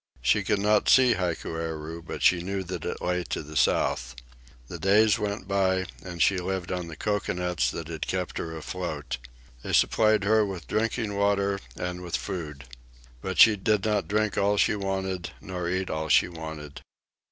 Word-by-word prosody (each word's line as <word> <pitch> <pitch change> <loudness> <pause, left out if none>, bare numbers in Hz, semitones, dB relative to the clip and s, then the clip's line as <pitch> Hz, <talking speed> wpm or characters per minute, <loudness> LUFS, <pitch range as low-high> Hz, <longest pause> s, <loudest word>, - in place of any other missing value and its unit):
She - - +3
could 105 - +1
not 105 +1 +2
see 130 -2 +6
Hikueru, 80 -2 -3
but 85 - -6
she 90 -1 +5
knew 95 +2 -3
that 90 -2 -6
it - - -4
lay 90 0 0
to - - -3
the 75 +1 -11
south. - - +1 0.5
The 85 - -7
days 105 +4 +4
went 105 -2 -3
by, 95 -1 +1 0.2
and 85 -4 -1
she 95 +4 +3
lived 90 0 -3
on 90 -2 -3
the 80 - -8
cocoanuts 90 -4 -1
that 80 -2 -5
had 80 -2 -5
kept 90 -1 -2
her 80 -1 -5
afloat. 80 -5 -4 0.4
They - - -5
supplied 110 -2 +4
her 110 +2 +4
with 95 -6 -5
drinking 110 - -1
water 100 -1 +1 0.2
and 90 0 -4
with 90 -1 -2
food. 75 -8 -6 0.6
But 95 0 -4
she 110 -2 +8
did 105 0 +1
not 105 -2 +1
drink 105 0 0
all 100 +1 +2
she 105 - +3
wanted, 95 -2 -3
nor 90 -2 -4
eat 95 +1 -1
all 80 0 -3
she - - +5
wanted. 80 -4 -8
95 Hz, 175 wpm, -27 LUFS, 85-100 Hz, 0.6 s, she